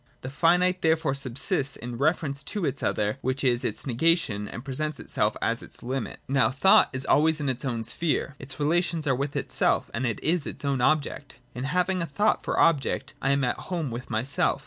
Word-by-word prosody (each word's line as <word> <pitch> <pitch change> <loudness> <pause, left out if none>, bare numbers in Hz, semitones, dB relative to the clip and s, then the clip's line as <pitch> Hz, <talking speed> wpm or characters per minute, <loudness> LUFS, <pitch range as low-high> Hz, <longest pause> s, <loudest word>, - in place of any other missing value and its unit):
The 130 - -6
finite 180 +4 +3
therefore 160 -3 +2
subsists 135 +1 0
in 120 0 -7
reference 145 -2 0
to 205 -5 -3
its 135 -2 -2
other, 105 +5 0
which 130 +1 -2
is 125 -2 +2
its 105 - -2
negation 130 - +1
and 120 - -8
presents 150 +2 -2
itself 105 +1 0
as 115 +1 0
its - - -8
limit. 130 +2 -3
Now 135 -4 +3
thought 140 +10 +5
is 130 0 -3
always 155 +1 +3
in 145 - -2
its 130 -1 -3
own 120 -4 -2
sphere; 145 +4 -1
its 135 +1 -7
relations 165 +1 +1
are 135 - +2
with 140 +3 -3
itself, - - 0
and 125 +3 -1
it 110 - -2
is 160 -1 +1
its - - -7
own 135 -3 0
object. 145 0 0 0.2
In 125 +2 -4
having 180 +4 0
a 165 - -2
thought 205 +10 +1
for - - -1
object, 140 -5 +2
I 135 - +1
am 140 0 +2
at 125 - 0
home 165 -8 -2
with 120 +2 -6
myself. 120 +5 0
140 Hz, 205 wpm, -26 LUFS, 125-160 Hz, 0.2 s, thought